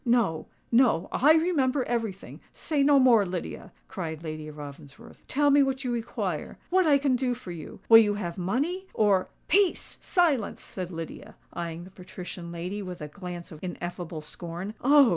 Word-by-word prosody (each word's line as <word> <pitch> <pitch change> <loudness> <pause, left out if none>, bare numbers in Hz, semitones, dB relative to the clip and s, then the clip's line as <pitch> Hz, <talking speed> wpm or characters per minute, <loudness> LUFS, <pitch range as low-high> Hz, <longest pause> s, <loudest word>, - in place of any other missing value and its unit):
"No—no: 235 - +1
I 300 +4 +5
remember 295 -5 +2
everything. 225 -5 -4
Say 300 -3 -1
no 285 0 +6
more, 245 -5 +6
Lydia," 180 -2 -5 0.2
cried 160 -4 -5
Lady 155 -1 -5
Ravensworth. 145 -1 -11
"Tell 290 +1 +3
me 285 +1 +6
what 270 0 0
you 250 - -1
require—what 320 +9 -1
I 285 -2 +6
can 275 -2 +2
do 250 -1 0
for 230 -7 -9
you! 165 -3 -9
Will 225 0 +10
you 205 -2 +3
have 175 -5 -4
money? 285 - -1
or——" 200 -4 +3 0.2
"Peace!—silence!" 350 - +1
said 185 -2 -6
Lydia, 165 -2 -8 0.2
eyeing 170 0 -5
the 185 - -13
patrician 180 -2 -8
lady 180 +4 -4
with 180 -2 -7
a 150 -1 -6
glance 180 -1 -8
of 155 - -10
ineffable 175 -3 -5
scorn. 175 +5 -6
"Oh!" 280 -1 +7
205 Hz, 160 wpm, -27 LUFS, 170-265 Hz, 0.2 s, Will